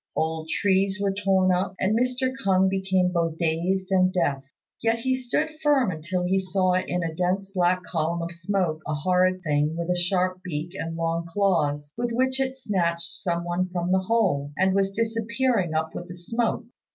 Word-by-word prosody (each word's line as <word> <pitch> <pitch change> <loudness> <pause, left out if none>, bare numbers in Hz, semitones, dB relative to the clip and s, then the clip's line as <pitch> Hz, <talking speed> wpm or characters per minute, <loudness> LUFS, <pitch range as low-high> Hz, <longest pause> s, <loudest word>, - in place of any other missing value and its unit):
Old 160 0 -1
trees 195 +1 +1
were 200 -1 0
torn 190 -2 +2
up, 185 +1 -1
and 200 +3 +2
Mr. 255 +2 0
K'ung 190 -6 +2
became 190 -1 +1
both 165 -2 0
dazed 175 +4 0
and 185 -1 +4
deaf. 145 -7 0 0.4
Yet 225 0 +2
he 260 +3 0
stood 255 +5 0
firm 275 -8 +3
until 170 +3 -3
he 190 +2 +2
saw 185 0 +1
in 180 -1 0
a 165 -1 -3
dense 185 +3 -1
black 180 -1 +1
column 170 0 -1
of 170 - -4
smoke 170 -2 -1
a 150 - -1
horrid 185 +4 +2
thing 150 0 +1
with 170 +1 -1
a - - +2
sharp 185 +1 +1
beak 165 -2 -4
and 165 -3 -4
long 165 0 -1
claws, 155 -6 0
with 240 0 0
which 260 +2 +1
it 265 0 -1
snatched 170 -8 -1
some 170 -1 -2
one 175 +1 -1
from 180 0 -2
the 190 - +4
hole, 185 -9 +1
and 190 0 +3
was 195 0 +2
disappearing 230 -3 0
up 160 0 -1
with 175 - -6
the 175 - -8
smoke. 230 +6 -1
185 Hz, 190 wpm, -25 LUFS, 170-200 Hz, 0.4 s, and